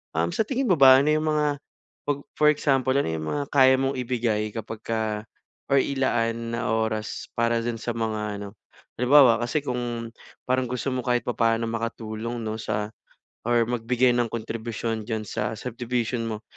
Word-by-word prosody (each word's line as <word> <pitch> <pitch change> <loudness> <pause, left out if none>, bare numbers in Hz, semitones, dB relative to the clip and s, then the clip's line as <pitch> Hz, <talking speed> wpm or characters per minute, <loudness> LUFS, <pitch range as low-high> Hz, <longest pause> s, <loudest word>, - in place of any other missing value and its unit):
Um, 85 +1 +1
sa 220 - +2
tingin 265 0 -1
mo 185 - +5
ba, 130 -1 +9
ano 150 - +1
'yung 155 0 +1
mga 150 -1 +1 0.5
pag 145 -1 +1 0.2
for 150 0 +5
example 135 -3 +1
ano 140 - +1
'yung 80 -1 -3
mga 145 - -1
kaya 130 -1 +6
mong 135 0 0
ibigay 115 -4 -1
kapagka 110 -1 -3 0.5
or 140 - +6
ilaan 115 -4 0
na 115 - -2
oras 110 -1 -2
para 115 0 +2
dun 115 -1 -2
sa 120 -1 -3
mga 110 -2 -2
ano. 100 -1 -6 0.5
Halimbawa, 125 -3 +6
kasi 140 +4 -1
kung 120 -3 -3 0.3
parang 130 -1 +1
gusto 125 +2 -2
mo 130 - -1
kahit 120 -2 +1
papaano 115 -1 +1
makatulong 115 0 -4
'no 110 0 -3
sa 105 0 -2 0.6
or 120 -1 +3
magbigay 125 +1 +2
ng 120 -1 +2
kontribusyon 115 -1 -4
diyan 110 -1 -2
sa 105 +1 -2
subdivision 120 0 -2
mo. 110 0 -5
115 Hz, 165 wpm, -25 LUFS, 110-130 Hz, 0.6 s, ba